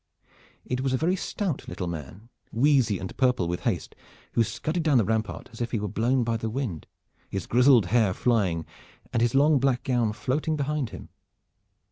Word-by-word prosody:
It 125 0 -2
was 130 -1 0
a - - +2
very 170 +6 +1
stout 185 -3 -3
little 90 - -4
man, 85 - -7 0.2
wheezy 125 -4 +3
and 95 +1 -7
purple 125 -9 +2
with 85 +1 -2
haste, - - -2 0.4
who 115 - +3
scudded 155 - -2
down 155 -4 +3
the 115 - +4
rampart 110 -1 -2
as 115 - -9
if 120 - -1
he 115 - -1
were 105 - -2
blown 120 +5 +1
by 115 0 0
the 110 0 -3
wind, 110 - -4 0.4
his 95 - -3
grizzled 125 -3 +5
hair 110 +1 +3
flying 95 -10 +1 0.5
and 115 - +1
his 120 +2 +2
long 145 +1 +5
black 130 -2 +1
gown 120 -4 +1
floating 140 +9 -1
behind 145 -3 -1
him. - - -10
120 Hz, 185 wpm, -26 LUFS, 105-135 Hz, 0.5 s, grizzled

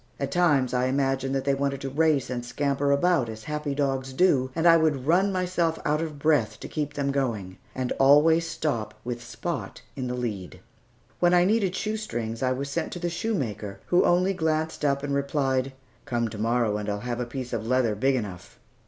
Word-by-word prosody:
At 140 -1 -2
times 145 -8 +2
I 125 0 +2
imagined 135 0 0
that 135 - -1
they 140 - +3
wanted 140 0 -1
to 135 - -3
race 150 -3 +2
and 120 -1 -3
scamper 140 +2 -1
about 140 -3 +2
as 110 0 -8
happy 150 0 -3
dogs 135 -2 -1
do, 130 -5 +3
and 165 +1 0
I 165 -1 +8
would 155 -5 +1
run 185 +6 +3
myself 180 -3 0
out 150 +1 +1
of 155 -3 -4
breath 140 -8 +1
to - - -6
keep 145 -1 -3
them 140 -1 0
going, 110 -9 -2 0.2
and 130 -1 -2
always 155 +4 +5
stop 115 -10 -2
with 120 0 -5
Spot 115 -2 -5 0.2
in 130 -2 -3
the 125 - -2
lead. 105 -7 -5 0.6
When 175 0 +4
I 175 0 +5
needed 200 -2 +1
shoestrings, 155 - -3
I 130 -1 +1
was 135 +2 -2
sent 140 - -3
to 175 - -5
the 175 0 -2
shoemaker, 130 - -3
who 180 - +3
only 180 +2 +3
glanced 160 -3 -1
up 140 -1 +1
and 140 -1 -2
replied, 135 -2 0 0.3
"Come 120 -2 -1
to 105 -1 -8
morrow, 115 -1 +1
and 105 0 -4
I'll 105 0 -2
have 120 0 -3
a 125 - -1
piece 125 0 -6
of 110 -1 -3
leather 125 -3 +2
big 130 +6 +1
enough." 95 -7 -6
135 Hz, 205 wpm, -26 LUFS, 120-160 Hz, 0.6 s, I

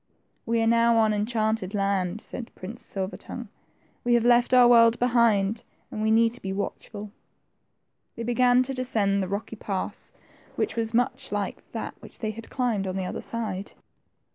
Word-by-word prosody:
We 230 0 +2
are - - +2
now 230 0 +4
on 220 -1 +4
enchanted 215 -2 -1
land," 195 0 0
said 240 - -7
Prince 215 +6 -8
Silver 190 0 -4
tongue; 240 -4 -8 0.5
we 240 0 +3
have 235 -1 +2
left 240 0 +4
our 250 -1 +7
world 230 -1 +6
behind, 230 -3 +2 0.3
and 215 - -4
we 220 - +2
need 225 +1 +4
to 245 - -11
be 190 - -4
watchful." 205 +1 -5 1.0
They 230 - -5
began 245 +1 +4
to 270 +1 -5
descend 215 -6 0
the 190 - -2
rocky 210 +2 -4
pass 195 -2 -4 0.4
which 425 - -1
was 225 -1 0
THE - - -12
TWO 245 - +6
FRINGES. 250 +2 -10
79 205 -1 -1
much - - -5
like - - -36
that - - -7
they 215 -2 -2
had 225 +1 -10
climbed 230 -7 -1
on 185 - -3
the 190 -1 -2
other - - -4
side. 205 -4 -4
225 Hz, 190 wpm, -26 LUFS, 200-240 Hz, 1.0 s, our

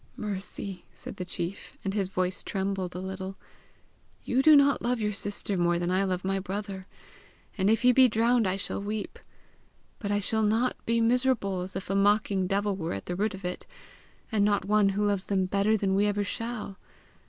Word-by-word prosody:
"Mercy," 200 -2 -5
said - - -9
the 180 - -4
chief 175 +2 -5
and 195 - -1
his 200 -2 0
voice 185 -1 -2
trembled 190 -2 -3
a - - -3
little, 190 0 -5 0.9
"you 255 +2 +2
do 310 +2 +8
not 280 -1 +5
love 245 0 0
your 210 -1 -1
sister 205 0 -3
more 175 0 +2
than 175 +1 -1
I 190 +1 +2
love 185 -1 -2
my 195 0 +1
brother, 195 0 -5 0.7
and 195 0 +2
if 225 +3 +2
he 250 - +7
be 260 +1 +6
drowned 230 0 +2
I 185 - +1
shall 200 - -3
weep; 210 +1 -4 0.8
but 205 -2 -3
I 205 - +2
shall 220 +2 +1
not 225 +4 +2
be 230 0 +2
miserable 230 -5 +1
as 185 +1 -5
if 190 - -5
a - - +1
mocking 200 -1 +2
devil 200 +1 0
were 165 -3 -3
at 95 - -5
the 180 - -3
root 205 +2 -1
of 190 -1 -9
it, 180 - -5 0.6
and 215 -2 +2
not 205 -1 +2
one 205 0 +4
who 205 +2 0
loves 200 -2 0
them 190 -2 +1
better 200 +3 +2
than 195 -2 0
we 200 +2 +3
ever 205 0 0
shall. 215 -2 -5
200 Hz, 200 wpm, -28 LUFS, 190-215 Hz, 0.9 s, do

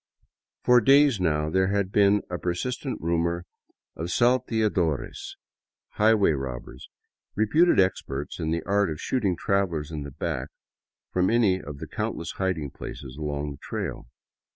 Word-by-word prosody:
For 125 0 +6
days 135 -2 +5
now 75 -3 0
there 95 +1 +2
had 100 -1 0
been 100 0 +4
persistent 90 - -3
rumors 85 +1 0 0.5
of 80 - -4
salteadores, 110 - 0 0.5
high 110 +1 +4
way 100 -6 +3
robbers, 65 -4 -6 0.5
reputed 150 - +4
experts 70 -7 -1
in 80 - -2
the 85 +1 -1
art 100 0 +2
of 75 -1 -5
shooting 105 -8 0
travelers 85 -6 0
in 75 -2 -4
the 70 - -6
back 65 - -3 0.6
from 90 0 +2
any 110 -6 +3
of 70 0 -8
the - - -6
countless - - -3
hiding 85 -7 -1
places 65 -1 -8
along 75 -1 -3
the 70 - -9
trail. - - -5
90 Hz, 140 wpm, -26 LUFS, 75-105 Hz, 0.6 s, For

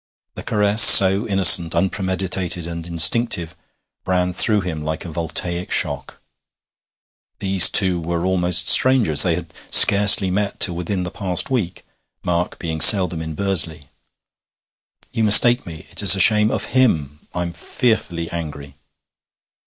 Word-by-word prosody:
The - - -11
caress, 105 0 -1
so 100 +2 +7
innocent, 95 -4 +3
unpremeditated, 95 -1 -5
and 85 0 -10
instinctive, 85 +1 0 0.5
ran 90 0 -4
through 105 +3 +3
him 85 -4 -9
like 80 +2 -8
a 85 - -11
voltaic 85 +3 -6
shock. 70 -7 -6 1.2
These 95 -2 +4
two 90 -4 +3
were 85 +1 -6
almost 90 -1 -1
strangers; 125 - +2
they - - 0
had - - -11 0.2
scarcely 100 -1 +5
met 100 +1 -6
till 90 - +3
within 90 +2 -7
the 90 - -9
past 90 +2 -4
week, 95 -9 -6 0.4
Mark 85 0 -5
being 80 -2 -8
seldom 90 -5 +4
in 80 -1 -10
Bursley. 85 -7 -3 1.2
'You 115 - -5
mistake 120 +3 +3
me 80 -2 -13
it - - -3
is 100 -2 +5
a - - -7
shame 105 +2 +1
of - - -7
him! 75 - -3
I'm 85 -1 -7
fearfully 85 -3 -5
angry.' 70 -4 -11
90 Hz, 135 wpm, -16 LUFS, 85-100 Hz, 1.2 s, so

